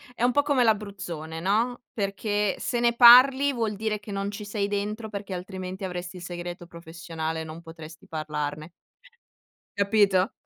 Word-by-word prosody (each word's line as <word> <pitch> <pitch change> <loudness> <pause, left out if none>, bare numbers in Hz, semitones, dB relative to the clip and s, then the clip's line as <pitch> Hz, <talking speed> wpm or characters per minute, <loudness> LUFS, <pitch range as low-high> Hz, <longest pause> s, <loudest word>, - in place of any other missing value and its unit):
è 235 - -3
un 245 - +4
po' 285 - +3
come 280 -4 +2
l'Abruzzone, 195 -7 -2
no, 225 +7 +1
perché 205 0 -1
se 240 - -1
ne 235 0 +2
parli, 260 +3 +8
vuol 225 -3 -2
dire 215 0 -2
che 210 0 -10
non 200 0 -3
ci 205 0 -7
sei 205 -1 -2
dentro, 210 +2 -3
perché 200 -1 -6
altrimenti 185 +1 -6
avresti 180 0 -6
il 175 - -9
segreto 175 0 -6
professionale, 165 -1 -6
non 160 +1 -9
potresti 165 -1 -12
parlarne. 155 0 -4 1.0
Capito? 200 -2 +2
200 Hz, 155 wpm, -26 LUFS, 170-220 Hz, 1.0 s, parli